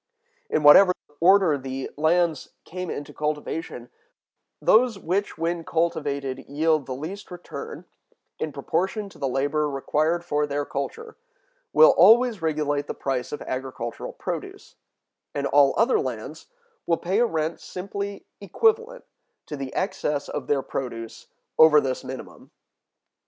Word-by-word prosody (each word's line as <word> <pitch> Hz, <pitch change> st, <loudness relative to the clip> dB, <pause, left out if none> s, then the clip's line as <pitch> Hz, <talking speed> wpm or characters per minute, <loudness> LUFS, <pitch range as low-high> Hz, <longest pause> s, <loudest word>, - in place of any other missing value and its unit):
In 150 Hz, -, 0 dB
whatever 180 Hz, +6 st, +8 dB, 0.3 s
order 180 Hz, -4 st, +5 dB
the 130 Hz, 0 st, -5 dB
lands 160 Hz, 0 st, +1 dB
come 180 Hz, 0 st, -5 dB
into 145 Hz, -, -6 dB
cultivation, 150 Hz, -4 st, -4 dB, 0.7 s
those 230 Hz, -1 st, +4 dB
which 195 Hz, +3 st, -2 dB
when 165 Hz, +1 st, -2 dB
cultivated 145 Hz, -5 st, -1 dB
yield 155 Hz, 0 st, +1 dB
the 130 Hz, -, -4 dB
least 180 Hz, +9 st, -7 dB
return, 175 Hz, -1 st, -8 dB, 0.5 s
in 155 Hz, -, -2 dB
proportion 185 Hz, +9 st, -2 dB
to -, -, -17 dB
the 135 Hz, -, -1 dB
labor 145 Hz, +3 st, 0 dB
required 155 Hz, +5 st, 0 dB
for 150 Hz, -2 st, 0 dB
their 145 Hz, 0 st, -2 dB
culture, 445 Hz, -, -5 dB, 0.5 s
will -, -, +7 dB
always 235 Hz, -, +5 dB
regulate 150 Hz, -2 st, -1 dB
the -, -, -5 dB
price 130 Hz, -3 st, -3 dB
of 150 Hz, -, -5 dB
agricultural 130 Hz, -3 st, -5 dB
produce; -, -, -6 dB, 0.6 s
and 140 Hz, -1 st, -1 dB
all 140 Hz, 0 st, +4 dB
other 235 Hz, +3 st, +3 dB
lands -, -, -5 dB, 0.4 s
will 165 Hz, -, +2 dB
pay 190 Hz, +5 st, -1 dB
a 240 Hz, -, +5 dB
rent 160 Hz, -2 st, -2 dB
simply 200 Hz, +2 st, -6 dB
equivalent 455 Hz, -, 0 dB, 0.4 s
to 150 Hz, -, -6 dB
the 135 Hz, -2 st, -6 dB
excess 150 Hz, -6 st, -1 dB
of 145 Hz, -3 st, -5 dB
their 140 Hz, -2 st, +1 dB
produce 115 Hz, -3 st, -6 dB, 0.3 s
over 160 Hz, -1 st, +8 dB
this 130 Hz, -3 st, -3 dB
minimum. 130 Hz, 0 st, -9 dB
155 Hz, 135 wpm, -24 LUFS, 140-185 Hz, 0.7 s, whatever